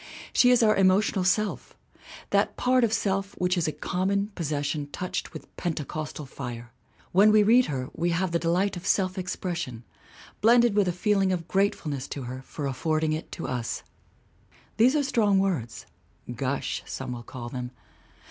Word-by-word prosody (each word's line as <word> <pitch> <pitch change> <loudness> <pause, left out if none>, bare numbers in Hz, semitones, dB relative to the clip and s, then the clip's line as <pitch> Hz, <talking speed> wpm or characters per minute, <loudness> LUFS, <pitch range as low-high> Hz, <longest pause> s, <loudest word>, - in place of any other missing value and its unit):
She 250 - +5
is 245 -2 +5
our 215 -1 +5
emotional 195 +1 +3
self 205 +3 0 0.6
that - - +2
part 255 0 +3
of 230 - +2
self 195 -2 -1
which 180 +1 +1
is 175 -3 0
a - - 0
common 195 +6 -1
possession 145 -3 -2
touched 180 +4 -4
with - - -11
pente 160 -4 -2
costal 155 -1 -5
fire. 120 -3 -7 0.4
When 205 +4 +6
we 215 0 +6
read 240 +4 +5
her 130 -3 -3
we 170 +2 -1
have 175 +1 0
the 170 - +1
delight 180 +4 +1
of 175 +1 -6
self 185 -2 +2
expression 175 -9 -4 0.6
blended 235 0 +5
with 205 -2 +3
a - - +2
feeling 195 +1 +1
of 170 -2 -2
grateful 195 -5 0
ness 135 -3 -4
to 140 - -6
her 130 +1 -6
for 145 +2 -6
affording 155 +4 0
it 155 - -5
to - - -5
us. 125 -3 -3 0.9
These 250 +6 +5
are 295 - +2
strong 215 -7 +2
words. 180 -12 -1 0.5
Gush, 135 +2 -2
some 130 -1 -5
will 120 -1 -5
call 120 0 -8
them. 125 -1 -5
180 Hz, 175 wpm, -26 LUFS, 145-200 Hz, 0.9 s, When